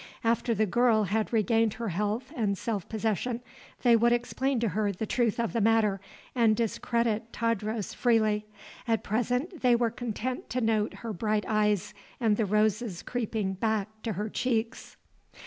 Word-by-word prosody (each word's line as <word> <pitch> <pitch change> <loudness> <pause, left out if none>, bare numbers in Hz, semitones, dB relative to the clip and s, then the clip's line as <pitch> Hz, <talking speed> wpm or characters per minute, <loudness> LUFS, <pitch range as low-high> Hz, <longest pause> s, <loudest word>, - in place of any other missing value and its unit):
After 230 +1 +1
the 215 +1 +2
girl 230 +1 +3
had 210 +3 -1
regained 225 -1 +2
her 230 -1 -3
health 210 - -2
and 205 -5 0
self 205 -4 -3
possession, 225 +2 -1 0.4
they 240 -2 +6
would 235 +1 +4
explain 245 +2 0
to 230 - +1
her 205 +1 0
the 200 +3 -4
truth 235 0 0
of 230 - -1
the 230 - +1
matter 215 -3 +3 0.3
and 230 -3 +4
discredit 230 0 -1
Tadros 220 -2 -2
freely; 215 -3 +2 0.4
at 225 -2 +1
present 250 - -1
they 245 -2 +5
were 235 -1 +1
content 245 +2 -4
to 255 - -1
note 220 -2 +1
her 225 - -3
bright 210 +2 0
eyes 210 -1 +1 0.3
and 225 -4 +3
the 215 -1 0
roses 210 -1 +1
creeping 220 -5 -2
back 215 +1 -1
to 225 - -2
her 205 +3 -3
cheeks. 235 +1 -2
225 Hz, 165 wpm, -28 LUFS, 210-235 Hz, 0.4 s, they